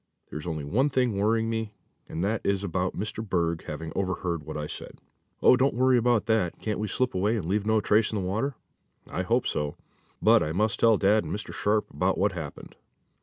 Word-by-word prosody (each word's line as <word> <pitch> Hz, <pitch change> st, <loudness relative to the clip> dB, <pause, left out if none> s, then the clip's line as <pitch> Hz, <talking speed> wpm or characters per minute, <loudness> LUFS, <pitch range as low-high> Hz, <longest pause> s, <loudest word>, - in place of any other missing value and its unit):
There's 75 Hz, +2 st, -6 dB
only 80 Hz, -3 st, -3 dB
one 120 Hz, -, +1 dB
thing 125 Hz, -5 st, +1 dB
worrying 110 Hz, +3 st, +1 dB
me, 110 Hz, -2 st, -3 dB, 0.4 s
and 80 Hz, -, -3 dB
that 110 Hz, +3 st, 0 dB
is 100 Hz, 0 st, 0 dB
about 90 Hz, -1 st, -2 dB
Mr. 110 Hz, +2 st, -3 dB
Berg 85 Hz, -5 st, -1 dB
having 80 Hz, +1 st, -6 dB
overheard 90 Hz, -3 st, -1 dB
what 75 Hz, +1 st, -7 dB
I 75 Hz, -, -3 dB
said." -, -, -8 dB, 0.5 s
"Oh, -, -, +8 dB
don't 135 Hz, 0 st, +2 dB
worry 130 Hz, +1 st, +4 dB
about 120 Hz, -2 st, +2 dB
that. 110 Hz, -6 st, +1 dB
Can't 105 Hz, -2 st, -2 dB
we 105 Hz, -, -1 dB
slip 130 Hz, +4 st, 0 dB
away 100 Hz, +5 st, +1 dB
and 100 Hz, -7 st, -3 dB
leave 100 Hz, +4 st, 0 dB
no 110 Hz, 0 st, +4 dB
trace 105 Hz, +1 st, +3 dB
in 110 Hz, -, -1 dB
the 90 Hz, -, -2 dB
water?" 115 Hz, +8 st, -1 dB, 0.5 s
"I 90 Hz, -, -3 dB
hope 115 Hz, +7 st, +1 dB
so, 75 Hz, -1 st, -2 dB, 0.4 s
but -, -, +5 dB
I 75 Hz, -, -1 dB
must 105 Hz, +3 st, 0 dB
tell 115 Hz, -2 st, +5 dB
dad 105 Hz, +2 st, +3 dB
and -, -, -6 dB
Mr. 105 Hz, +1 st, -4 dB
Sharp 105 Hz, +1 st, +1 dB
about 95 Hz, +1 st, 0 dB
what 100 Hz, +2 st, +2 dB
happened." 80 Hz, -6 st, -8 dB
105 Hz, 215 wpm, -27 LUFS, 90-110 Hz, 0.5 s, Oh